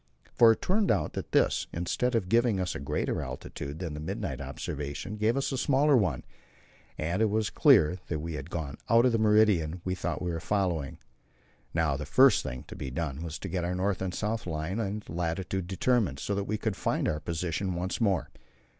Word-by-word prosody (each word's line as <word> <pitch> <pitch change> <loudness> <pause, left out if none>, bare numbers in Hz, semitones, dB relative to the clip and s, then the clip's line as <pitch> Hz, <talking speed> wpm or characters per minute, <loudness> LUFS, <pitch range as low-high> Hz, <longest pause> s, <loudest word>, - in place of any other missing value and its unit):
For 115 -1 +7
it - - -9
turned 200 +1 +2
out - - +1
that - - -5
this, - - +2
instead 95 +9 -1
of 105 -5 0
giving 115 -1 +3
us 90 -2 -1
a - - -5
greater 70 - -1
altitude 70 +2 -6
than 85 -3 -4
the 75 - -6
midnight 75 - -4
observation, 75 +8 -5
gave 110 +4 +1
us 135 - 0
a 135 - -1
smaller 140 +1 +4
one, 90 - +1 0.7
and 85 +6 -1
it 110 - +4
was 110 0 0
then - - -21
clear 80 +4 +6
that 80 - -2
we 80 +2 -5
had 75 +1 -6
gone 80 -5 -4
out 115 +2 +6
of 125 - +4
the 115 - +1
meridian 105 -6 +3
we 95 - 0
thought 90 - -3
we 90 -1 -2
were 85 - -3
following. 85 -6 -1 0.7
Now 80 -4 +1
the 75 +1 -6
first 130 - +6
thing 60 0 -6
to - - -10
be 65 - -5
done 70 +1 -3
was 80 -2 -5
to - - -6
get 90 -2 -2
our 90 +1 -1
north 95 +1 0
and 95 -1 -1
south 110 +2 -2
line 80 +5 -3
and 105 -1 -3
latitude 90 +2 -2
determined, 100 - +1
so 100 - -2
that 100 0 -1
we 110 +1 -1
could 110 -2 -2
find - - 0
our 75 - 0
position 85 +3 -2
once 90 +6 -3
more. 100 -6 +1
90 Hz, 215 wpm, -29 LUFS, 80-110 Hz, 0.7 s, For